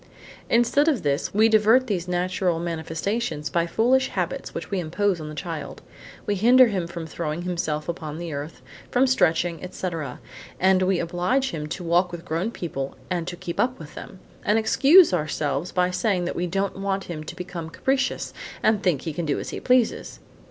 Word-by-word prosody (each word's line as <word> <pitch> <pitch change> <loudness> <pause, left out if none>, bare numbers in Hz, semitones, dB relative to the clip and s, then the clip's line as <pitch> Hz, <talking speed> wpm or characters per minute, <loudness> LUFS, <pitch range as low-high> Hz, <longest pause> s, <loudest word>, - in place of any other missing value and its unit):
Instead 240 +6 +3
of 280 - +2
this, 140 -1 0
we 215 +2 +4
divert 220 +4 +5
these 185 -7 -2
natural 180 -1 0
manifestations 165 - -3
by 170 0 +1
foolish 255 +7 +3
habits - - -3
which - - -7
we 195 - 0
impose 180 +2 0
on 150 - -6
the 155 - -8
child. 165 -3 -6 0.4
We 205 - 0
hinder 240 +5 +6
him 185 -5 -2
from 170 -1 -6
throwing 160 +1 -4
himself 165 -4 -2
on 155 -1 -5
the 170 -2 -5
earth, 145 +3 -6 0.3
from 250 +2 +3
stretching, 170 - +1
etc., 165 -7 -5 0.4
and 190 0 +4
we 185 0 +2
oblige 180 +11 0
him 150 -2 -4
to 175 +4 -5
walk 175 +2 +2
with 175 0 -8
grown 170 +6 -1
people 140 -11 -5 0.2
and 175 -2 -1
to 175 - -4
keep 175 -1 -6
up 250 +1 +1
with 155 -2 -11
them; 190 - -9 0.3
and 210 +2 +3
excuse 280 - +6
ourselves 155 -1 -1
by 180 0 +1
saying 185 -1 0
that - - -3
we 180 - -1
don't 195 +2 -2
want 195 0 -1
him 155 -3 -6
to 160 - -8
become 175 -2 -6
capricious 270 +9 -1 0.3
and 215 -2 +3
think 175 -9 +1
he 160 - -3
can 165 +1 -3
do 145 - +1
as - - -5
he - - -5
pleases! 250 -2 +1
180 Hz, 190 wpm, -24 LUFS, 165-210 Hz, 0.4 s, hinder